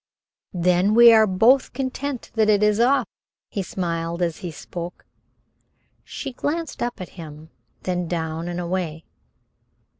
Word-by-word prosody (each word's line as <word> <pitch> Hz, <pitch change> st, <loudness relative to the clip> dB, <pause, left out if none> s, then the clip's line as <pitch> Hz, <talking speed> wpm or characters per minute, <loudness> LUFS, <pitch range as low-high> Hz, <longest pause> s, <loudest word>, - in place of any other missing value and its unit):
"Then 180 Hz, +4 st, +2 dB
we 235 Hz, 0 st, +9 dB
are 220 Hz, -1 st, +6 dB
both 225 Hz, +8 st, +3 dB
content 265 Hz, 0 st, -4 dB
that 220 Hz, -1 st, +2 dB
it 210 Hz, -1 st, +4 dB
is 210 Hz, 0 st, +3 dB
off." 260 Hz, +4 st, +3 dB, 0.5 s
He 200 Hz, -, -2 dB
smiled 170 Hz, -2 st, -3 dB
as 170 Hz, -2 st, -1 dB
he 180 Hz, -, -6 dB
spoke. 170 Hz, +2 st, -8 dB, 1.0 s
She 270 Hz, -2 st, -6 dB
glanced 325 Hz, +5 st, -3 dB
up 240 Hz, -1 st, -2 dB
at 185 Hz, -, -7 dB
him, 155 Hz, -2 st, -11 dB, 0.3 s
then 180 Hz, -1 st, -2 dB
down 160 Hz, 0 st, -3 dB
and 175 Hz, 0 st, -4 dB
away. 170 Hz, -3 st, -3 dB
185 Hz, 140 wpm, -23 LUFS, 170-235 Hz, 1.0 s, we